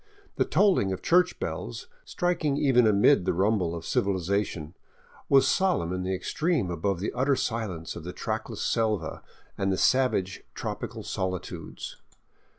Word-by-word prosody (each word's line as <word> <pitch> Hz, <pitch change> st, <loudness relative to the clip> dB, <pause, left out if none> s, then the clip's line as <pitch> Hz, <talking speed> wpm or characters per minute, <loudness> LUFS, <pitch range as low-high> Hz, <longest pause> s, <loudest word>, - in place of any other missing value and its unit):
The -, -, +3 dB
tolling 185 Hz, -, +3 dB
of 95 Hz, -, -4 dB
church 180 Hz, +1 st, +3 dB
bells, -, -, -5 dB, 0.2 s
striking 170 Hz, -5 st, 0 dB
even 125 Hz, -5 st, +4 dB
amid 105 Hz, +3 st, +5 dB
the 95 Hz, -, +1 dB
rumble 95 Hz, -3 st, +1 dB
of 85 Hz, -1 st, -7 dB
civilization, 95 Hz, -4 st, -1 dB, 0.6 s
was 135 Hz, -1 st, +6 dB
solemn 175 Hz, -, +1 dB
in 90 Hz, -, -2 dB
the 95 Hz, +1 st, -1 dB
extreme 150 Hz, -, -1 dB
above 85 Hz, +2 st, -1 dB
the 105 Hz, -, -2 dB
utter 135 Hz, +3 st, +2 dB
silence 110 Hz, -10 st, -3 dB
of 85 Hz, -, -7 dB
the 90 Hz, -, -5 dB
trackless -, -, -4 dB
seha 110 Hz, -8 st, 0 dB, 0.4 s
and 95 Hz, -1 st, +1 dB
savage 125 Hz, -8 st, +2 dB
tropical -, -, -5 dB
solitudes. 95 Hz, -1 st, -5 dB
100 Hz, 140 wpm, -27 LUFS, 90-135 Hz, 0.6 s, was